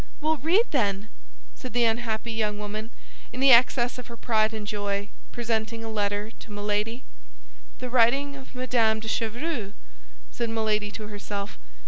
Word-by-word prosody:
"Well, 315 Hz, +1 st, +1 dB
read, 340 Hz, -, +4 dB
then!" 205 Hz, -5 st, +1 dB, 0.4 s
said 255 Hz, -, -8 dB
the 240 Hz, 0 st, +4 dB
unhappy 225 Hz, 0 st, 0 dB
young 215 Hz, -2 st, 0 dB
woman, 210 Hz, +2 st, -5 dB, 0.4 s
in 250 Hz, -, -6 dB
the 270 Hz, 0 st, +7 dB
excess 245 Hz, 0 st, +5 dB
of 250 Hz, -, -8 dB
her 235 Hz, -, -9 dB
pride 220 Hz, -1 st, +2 dB
and 215 Hz, -2 st, -5 dB
joy, 205 Hz, -1 st, -2 dB, 0.2 s
presenting 225 Hz, -1 st, -2 dB
a 225 Hz, -, -4 dB
letter 205 Hz, 0 st, -1 dB
to -, -, -11 dB
Milady. 210 Hz, +4 st, -1 dB, 0.7 s
"The 255 Hz, -, -5 dB
writing 265 Hz, +4 st, +4 dB
of 265 Hz, -1 st, -12 dB
Madame 235 Hz, -4 st, +2 dB
de 220 Hz, -, -7 dB
Chevreuse!" 225 Hz, 0 st, -2 dB, 0.6 s
said 235 Hz, -1 st, -2 dB
Milady 215 Hz, -2 st, +1 dB
to 215 Hz, +1 st, -7 dB
herself. 205 Hz, -1 st, -5 dB
225 Hz, 155 wpm, -27 LUFS, 210-245 Hz, 0.7 s, the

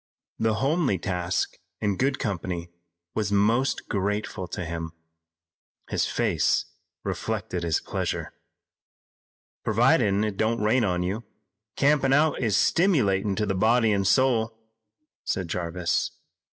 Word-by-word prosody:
The 110 Hz, -1 st, +2 dB
homely 135 Hz, -, +1 dB
task 90 Hz, 0 st, -2 dB, 0.2 s
in 105 Hz, -2 st, 0 dB
good 135 Hz, +5 st, +1 dB
company 90 Hz, -3 st, -3 dB, 0.4 s
was 105 Hz, -2 st, -1 dB
most 115 Hz, +7 st, +2 dB
grateful 100 Hz, -2 st, -2 dB
to 90 Hz, +1 st, -5 dB
him. 80 Hz, -1 st, -5 dB, 1.0 s
His -, -, 0 dB
face -, -, +1 dB, 0.4 s
reflected 90 Hz, -, -3 dB
his 85 Hz, -2 st, +1 dB
pleasure. -, -, -3 dB, 1.3 s
"Providin' 100 Hz, 0 st, +3 dB
it 105 Hz, -2 st, -2 dB
don't 115 Hz, +2 st, +1 dB
rain 115 Hz, +4 st, +3 dB
on 90 Hz, -3 st, 0 dB
you, 100 Hz, +6 st, -2 dB, 0.5 s
campin' 140 Hz, -1 st, +3 dB
out 150 Hz, +1 st, +3 dB
is 110 Hz, -4 st, +2 dB
stimulatin' 105 Hz, -, +2 dB
to 105 Hz, -, 0 dB
the 95 Hz, -, 0 dB
body 110 Hz, +3 st, +3 dB
an' 100 Hz, -1 st, +1 dB
soul," 115 Hz, -1 st, +2 dB, 0.7 s
said 95 Hz, -2 st, -2 dB
Jarvis. 85 Hz, 0 st, -1 dB
105 Hz, 120 wpm, -26 LUFS, 95-120 Hz, 1.3 s, Providin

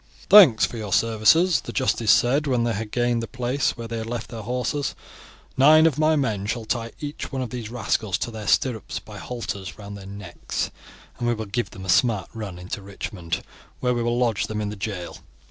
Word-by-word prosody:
"Thanks 180 Hz, -, +9 dB
for 120 Hz, -, -7 dB
your 105 Hz, -3 st, -5 dB
services," 115 Hz, -, +4 dB
the -, -, -7 dB
justice 120 Hz, -4 st, 0 dB
said 135 Hz, +8 st, +4 dB
when 125 Hz, -3 st, +2 dB
they 120 Hz, -1 st, 0 dB
had 110 Hz, +1 st, -4 dB
gained 120 Hz, 0 st, +1 dB
the 115 Hz, -, -4 dB
place 125 Hz, +6 st, -1 dB
where 115 Hz, -1 st, -6 dB
they 115 Hz, 0 st, -4 dB
had 110 Hz, -, -5 dB
left 115 Hz, -1 st, -4 dB
their 115 Hz, -2 st, -6 dB
horses. 125 Hz, +5 st, -2 dB, 0.6 s
"Nine 155 Hz, +4 st, +7 dB
of 155 Hz, -3 st, +2 dB
my 155 Hz, 0 st, +4 dB
men 110 Hz, -9 st, -1 dB
shall 115 Hz, 0 st, -2 dB
tie 115 Hz, 0 st, -2 dB
each 145 Hz, 0 st, -6 dB
one 135 Hz, -2 st, -2 dB
of 120 Hz, -, -6 dB
these 120 Hz, -3 st, -5 dB
rascals 110 Hz, -4 st, -1 dB
to 120 Hz, -, -3 dB
their 110 Hz, -2 st, -7 dB
stirrups 115 Hz, -7 st, +1 dB
by -, -, -9 dB
halters 105 Hz, -6 st, -5 dB
round 100 Hz, -1 st, -8 dB
their 100 Hz, -1 st, -10 dB
necks, 100 Hz, -3 st, -5 dB, 0.5 s
and 120 Hz, -, -1 dB
we 120 Hz, -, +2 dB
will 110 Hz, 0 st, -5 dB
give 110 Hz, +4 st, -2 dB
them 95 Hz, -, -10 dB
a -, -, -7 dB
smart 110 Hz, -3 st, +2 dB
run 105 Hz, -6 st, -6 dB
into 90 Hz, +3 st, -6 dB
Richmond, 95 Hz, -4 st, -5 dB, 0.4 s
where 125 Hz, -1 st, +1 dB
we 120 Hz, -, -1 dB
will 120 Hz, +1 st, 0 dB
lodge 115 Hz, -4 st, +1 dB
them 110 Hz, -1 st, -3 dB
in 105 Hz, -1 st, -2 dB
the 105 Hz, -, -5 dB
jail. 95 Hz, -3 st, -5 dB
115 Hz, 215 wpm, -24 LUFS, 105-125 Hz, 0.6 s, Thanks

